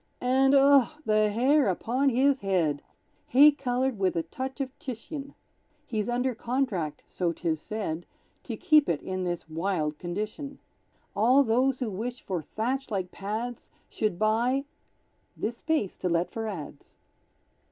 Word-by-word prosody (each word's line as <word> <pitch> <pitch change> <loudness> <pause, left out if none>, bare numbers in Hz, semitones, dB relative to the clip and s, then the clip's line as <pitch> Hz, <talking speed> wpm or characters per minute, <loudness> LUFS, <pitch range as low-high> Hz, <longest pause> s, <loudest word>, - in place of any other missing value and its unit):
And 265 +2 +3
oh! 280 +1 +5
the 215 -1 +3
hair 265 +6 +3
upon 250 +9 +1
his 270 +2 +3
head! 170 -8 0 0.5
Hay 285 +4 +8
coloured, 255 -4 -1
with 190 -2 +1
a 165 - 0
touch 260 - -6
of 265 -1 -2
Titian! 275 +3 -7 0.5
He's 220 -4 -2
under 250 +1 0
contract, 225 - -2
so 175 -2 -1
'tis 160 -2 -2
said, 190 -7 -4 0.4
To - - -5
keep 305 -2 +4
it 160 -4 -1
in 185 -1 -3
this 175 -2 -3
wild 160 -2 -2
condition; 215 - -5 0.6
All 250 +7 +5
those 255 +2 +1
who 230 -4 -1
wish 240 +6 -4
for 180 -4 -3
thatch 250 - -3
like 190 -4 -2
Pad's 220 +4 -5 0.2
Should 210 -5 -1
buy 235 +7 +1 0.7
(This 235 +2 -3
space 310 - -1
To 180 - -2
Let 170 +1 0
for 225 -1 -4
Ads.) 155 -8 -8
225 Hz, 145 wpm, -28 LUFS, 185-265 Hz, 0.7 s, Hay